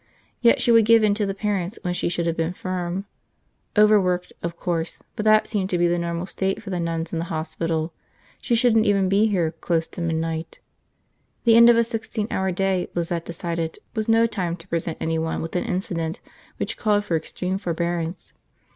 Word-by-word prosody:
Yet 235 Hz, -1 st, +5 dB
she 240 Hz, -, +3 dB
would 230 Hz, -2 st, +6 dB
give 225 Hz, 0 st, +6 dB
in 210 Hz, -1 st, +4 dB
to 205 Hz, -1 st, -1 dB
the 195 Hz, -, -2 dB
parents 200 Hz, -1 st, -2 dB
when 180 Hz, -, -1 dB
she 175 Hz, -, -1 dB
should 170 Hz, -1 st, -1 dB
have 165 Hz, -1 st, 0 dB
been 165 Hz, +1 st, -1 dB
firm. 185 Hz, +1 st, -3 dB, 0.7 s
Overworked, 190 Hz, -4 st, +4 dB
of 170 Hz, 0 st, -4 dB
course, 170 Hz, -2 st, -3 dB
but 215 Hz, -, -3 dB
that 215 Hz, 0 st, +5 dB
seemed 195 Hz, -4 st, -2 dB
to 180 Hz, -, +1 dB
be 175 Hz, 0 st, +3 dB
the 175 Hz, 0 st, +1 dB
normal 170 Hz, +1 st, -2 dB
state 195 Hz, +3 st, -2 dB
for 195 Hz, -, -6 dB
the 180 Hz, -, -1 dB
nuns 165 Hz, 0 st, -3 dB
in 165 Hz, -, -1 dB
the 165 Hz, -, -2 dB
hospital. 160 Hz, 0 st, -2 dB, 0.5 s
She 240 Hz, -, +1 dB
shouldn't 225 Hz, -2 st, +4 dB
even 195 Hz, -2 st, +3 dB
be 205 Hz, +3 st, +4 dB
here, 175 Hz, -6 st, +1 dB
close 165 Hz, 0 st, -1 dB
to 175 Hz, -, -7 dB
midnight. 165 Hz, 0 st, -2 dB, 0.8 s
The 230 Hz, -2 st, +6 dB
end 235 Hz, +1 st, +9 dB
of 235 Hz, -, +6 dB
a 235 Hz, -, +5 dB
sixteen 220 Hz, -1 st, -3 dB
hour 190 Hz, 0 st, 0 dB
day, 190 Hz, 0 st, 0 dB
Lizette 170 Hz, -1 st, -2 dB
decided, 170 Hz, -1 st, -3 dB, 0.2 s
was 220 Hz, -1 st, -1 dB
no 225 Hz, 0 st, +5 dB
time 185 Hz, -7 st, -2 dB
to 165 Hz, +2 st, -14 dB
present 165 Hz, -2 st, -2 dB
anyone 160 Hz, 0 st, -1 dB
with 165 Hz, -, -5 dB
an 180 Hz, -, 0 dB
incident 180 Hz, -6 st, -2 dB, 0.4 s
which -, -, -3 dB
called 205 Hz, -2 st, +1 dB
for 175 Hz, -, 0 dB
extreme 180 Hz, +4 st, -3 dB
forbearance. 170 Hz, 0 st, -3 dB
180 Hz, 200 wpm, -23 LUFS, 170-210 Hz, 0.8 s, end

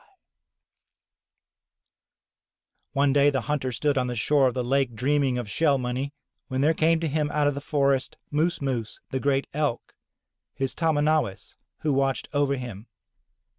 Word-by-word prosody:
'* -, -, -27 dB, 2.9 s
One 140 Hz, -1 st, +3 dB
day 145 Hz, 0 st, +5 dB
the 135 Hz, -2 st, 0 dB
hunter 140 Hz, -3 st, -2 dB
stood 140 Hz, +3 st, +1 dB
on 125 Hz, -, 0 dB
the 125 Hz, -, -3 dB
shore 135 Hz, +3 st, +3 dB
of 125 Hz, -, -2 dB
the 125 Hz, -, -1 dB
lake 130 Hz, -1 st, +1 dB
dreaming 135 Hz, +1 st, +1 dB
of 120 Hz, -3 st, -4 dB
shell 145 Hz, +5 st, +2 dB
money, 130 Hz, +2 st, -3 dB, 0.4 s
when 130 Hz, 0 st, -1 dB
there 155 Hz, +3 st, +4 dB
came 165 Hz, +1 st, +2 dB
to 165 Hz, -, 0 dB
him 150 Hz, 0 st, 0 dB
out 150 Hz, 0 st, +1 dB
of 145 Hz, -, +2 dB
the 140 Hz, -, -5 dB
forest, 140 Hz, -2 st, 0 dB
Moos 155 Hz, +1 st, 0 dB
Moos, 120 Hz, -5 st, -3 dB
the 130 Hz, -, -1 dB
great 135 Hz, 0 st, +1 dB
Elk, 145 Hz, -5 st, -2 dB, 0.6 s
his 135 Hz, -1 st, -1 dB
tahmahnawis 155 Hz, -, 0 dB, 0.3 s
who 150 Hz, -2 st, +1 dB
watched 135 Hz, 0 st, 0 dB
over 145 Hz, -1 st, +2 dB
him. 120 Hz, -4 st, -7 dB
140 Hz, 160 wpm, -26 LUFS, 130-145 Hz, 2.9 s, day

